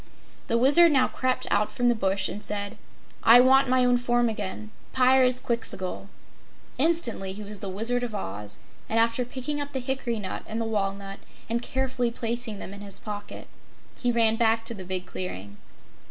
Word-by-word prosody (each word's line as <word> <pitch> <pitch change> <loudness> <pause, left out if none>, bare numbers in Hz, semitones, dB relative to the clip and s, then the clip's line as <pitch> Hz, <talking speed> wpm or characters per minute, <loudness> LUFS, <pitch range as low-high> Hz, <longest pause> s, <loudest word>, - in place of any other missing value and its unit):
The 230 - +2
Wizard 295 +7 +6
now 260 -3 +4
crept 255 0 -1
out 210 0 +2
from 245 +3 0
the 240 - +5
bush 195 -3 0
and 210 - -7
said: 205 -1 -3 0.5
"I 235 +2 +8
want 265 +1 +5
my 255 0 +3
own 245 0 +4
form 240 -1 +1
again 105 - -5 0.2
Pyrzqxgl!" 250 -7 +1 0.7
Instantly 255 - +2
he 210 +2 -8
was 205 0 -5
the 195 - -5
Wizard 230 +6 -1
of 235 -3 -4
Oz, 105 - -5 0.3
and 220 - 0
after 230 +2 +2
picking 265 +4 -3
up 285 0 -6
the 265 - -1
hickory 250 -2 -2
nut 190 -3 -5
and 220 - -4
the 230 - -1
walnut, 195 -2 -3 0.3
and 235 +1 -1
carefully 260 -1 -1
placing 230 -1 -3
them 195 - -8
in 200 - -10
his 200 -1 -3
pocket, 205 -1 -7 0.5
he 245 - 0
ran 225 -1 +3
back 225 0 +2
to 230 - +1
the 195 -4 -8
big 185 0 -3
clearing. 100 - -7
230 Hz, 180 wpm, -26 LUFS, 200-250 Hz, 0.7 s, I